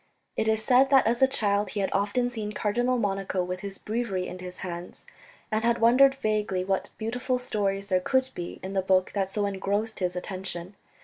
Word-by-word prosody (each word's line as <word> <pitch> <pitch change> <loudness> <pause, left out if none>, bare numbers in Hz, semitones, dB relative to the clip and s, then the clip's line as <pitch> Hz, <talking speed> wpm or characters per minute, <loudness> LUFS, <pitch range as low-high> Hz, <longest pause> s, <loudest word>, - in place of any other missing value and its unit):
It 220 - 0
is 220 0 +1
said 260 +3 +5
that 270 -1 +6
as 235 +3 +1
a 265 - +7
child 205 -6 +1
he 205 - -3
had 195 - 0
often 210 +5 +1
seen 215 -3 -4
Cardinal 240 +5 +1
Monico 195 -3 -1
with 180 0 -4
his 200 -1 -6
Breviary 210 -5 -2
in 185 - -7
his 180 0 -8
hands, 175 0 -7 0.5
and 215 +1 0
had 235 0 +3
wondered 260 +4 +6
vaguely 210 -6 -1
what 195 0 -1
beautiful 245 +3 -1
stories 200 -5 -1
there 185 -2 +1
could 260 +5 +1
be 175 -1 -6
in 190 +1 -5
the 190 - +2
book 185 0 +2
that 195 -2 0
so 205 +1 -1
engrossed 200 +3 -2
his 180 -1 -1
attention. 185 0 -5
205 Hz, 200 wpm, -27 LUFS, 190-235 Hz, 0.5 s, a